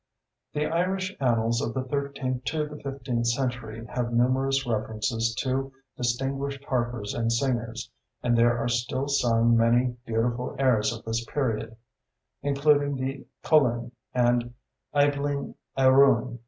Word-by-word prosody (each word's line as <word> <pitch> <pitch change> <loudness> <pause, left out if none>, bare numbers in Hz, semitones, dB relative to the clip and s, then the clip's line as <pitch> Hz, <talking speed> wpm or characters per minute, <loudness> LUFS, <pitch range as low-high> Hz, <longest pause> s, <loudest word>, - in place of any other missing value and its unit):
The 150 0 0
Irish 190 +4 -1
Annals 115 -2 +1
of 115 -4 -3
the 130 - -1
thirteenth 135 -2 -3
to 155 0 -1
the 150 0 -10
fifteenth 130 -4 -2
century 120 -3 -2
have 120 0 -3
numerous 135 +3 +2
references 115 0 -1
to 135 +3 -1 0.2
distinguished 135 +3 -2
harpers 120 -5 -2
and 115 -1 0
singers, 115 -2 -1 0.3
and 120 -1 +2
there 120 0 +4
are 120 - -1
still 125 +3 -1
sung 115 -4 +3
many 120 +2 +3
beautiful 120 +2 -1
airs 120 -5 +3
of 115 -1 -8
this 115 +1 -1
period, 115 -4 -2 0.7
including 145 0 +2
"The 135 +1 -4 0.2
Coulin" 120 -6 +3 0.2
and 120 -1 +1 0.4
"Eibhlin 145 0 +1 0.2
a 130 -1 +5
ruin." 130 -3 +4
125 Hz, 130 wpm, -26 LUFS, 115-140 Hz, 0.7 s, a